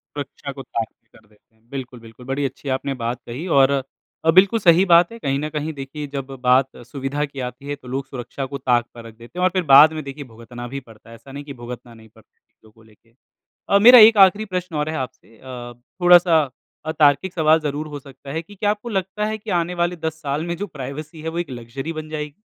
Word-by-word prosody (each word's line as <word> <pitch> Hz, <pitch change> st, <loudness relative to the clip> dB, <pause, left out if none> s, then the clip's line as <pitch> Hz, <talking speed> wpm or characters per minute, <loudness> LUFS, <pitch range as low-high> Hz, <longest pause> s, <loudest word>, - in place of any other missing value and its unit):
सुरक्षा 145 Hz, 0 st, -6 dB
को 135 Hz, 0 st, -9 dB
ताक 115 Hz, -2 st, -3 dB, 0.3 s
पर -, -, -18 dB
रख 105 Hz, -, -28 dB
देते 105 Hz, +1 st, -30 dB
हैं। 110 Hz, +1 st, -34 dB
बिल्कुल, 130 Hz, -3 st, -7 dB
बिल्कुल, 115 Hz, +2 st, -14 dB
बहुत 135 Hz, +2 st, -3 dB
अच्छी 135 Hz, +1 st, -6 dB
बात 130 Hz, -1 st, -3 dB
आपने 120 Hz, +1 st, -4 dB
कही 135 Hz, +7 st, -6 dB
है। 180 Hz, -, -5 dB
और 135 Hz, -1 st, +4 dB, 0.5 s
बिल्कुल 195 Hz, +5 st, +5 dB
सही 180 Hz, 0 st, +5 dB
बात 170 Hz, +2 st, +5 dB
है, 230 Hz, -, -10 dB
कहीं 135 Hz, -7 st, -1 dB
न 150 Hz, +1 st, -3 dB
कहीं 155 Hz, +1 st, -4 dB
देखिए, 145 Hz, +2 st, -7 dB
जब 140 Hz, -1 st, -5 dB, 0.2 s
बात 130 Hz, +1 st, +5 dB, 0.2 s
सुविधा 140 Hz, +2 st, -3 dB
की 140 Hz, -1 st, -11 dB
आती 125 Hz, +2 st, -11 dB
है, 145 Hz, -, -3 dB
तो 130 Hz, -3 st, -17 dB
लोग 135 Hz, +2 st, -3 dB
सुरक्षा 135 Hz, +1 st, -6 dB
को 140 Hz, +1 st, -6 dB
ताक 120 Hz, -3 st, +1 dB
पर 115 Hz, -1 st, -11 dB
रख 115 Hz, -1 st, -12 dB
देते 120 Hz, +10 st, -11 dB
हैं। -, -, 0 dB
और 185 Hz, -, +5 dB
फिर 185 Hz, -1 st, +1 dB
बाद 155 Hz, +3 st, +9 dB
में, 155 Hz, -1 st, -5 dB
देखिए, 140 Hz, +1 st, -7 dB
भुगतना 120 Hz, +2 st, -9 dB
भी 140 Hz, -, -3 dB
पड़ता 110 Hz, +1 st, -17 dB
है। 115 Hz, -, -11 dB
ऐसा 115 Hz, +4 st, -15 dB
नहीं 140 Hz, +1 st, -7 dB
है -, -, -22 dB
कि 140 Hz, -, -8 dB
भुगतना 120 Hz, 0 st, -9 dB
नहीं 110 Hz, -1 st, -17 dB
पड़ता 110 Hz, 0 st, -23 dB
है -, -, -46 dB
चीज़ों 110 Hz, -, -24 dB
को 110 Hz, +1 st, -22 dB
लेके। 110 Hz, +1 st, -25 dB, 0.6 s
अ, 200 Hz, -, +5 dB
मेरा 245 Hz, +3 st, +10 dB
एक 225 Hz, -, -5 dB
आख़िरी 205 Hz, +3 st, -1 dB
प्रश्न 180 Hz, -2 st, -3 dB
और 150 Hz, +1 st, -1 dB
है 160 Hz, -, -3 dB
आपसे, 125 Hz, -3 st, -8 dB
अ, 125 Hz, -2 st, -9 dB, 0.3 s
थोड़ा-सा 175 Hz, -4 st, +6 dB, 0.4 s
अतार्किक 155 Hz, +4 st, +3 dB
सवाल 160 Hz, -1 st, +4 dB
ज़रूर 150 Hz, 0 st, -3 dB
हो 145 Hz, -1 st, -7 dB
सकता 140 Hz, 0 st, -12 dB
है, 160 Hz, +3 st, -2 dB
कि 205 Hz, +5 st, -16 dB
क्या 205 Hz, +1 st, 0 dB
आपको 210 Hz, +3 st, -5 dB
लगता 195 Hz, 0 st, -2 dB
है 215 Hz, 0 st, -2 dB
कि 210 Hz, -, -10 dB
आने 175 Hz, +2 st, -4 dB
वाले 175 Hz, +1 st, -1 dB
10 160 Hz, -1 st, -5 dB
साल 145 Hz, +1 st, -2 dB
में 170 Hz, 0 st, -3 dB
जो 205 Hz, +3 st, -4 dB
प्राइवेसी 150 Hz, +2 st, -8 dB
है, 160 Hz, -, -3 dB
वो 165 Hz, +1 st, -4 dB
एक 175 Hz, -, -4 dB
लक्ज़री 125 Hz, +6 st, -6 dB
बन 155 Hz, -1 st, -7 dB
जाएगी? 150 Hz, -1 st, -5 dB
140 Hz, 250 wpm, -21 LUFS, 125-165 Hz, 0.6 s, मेरा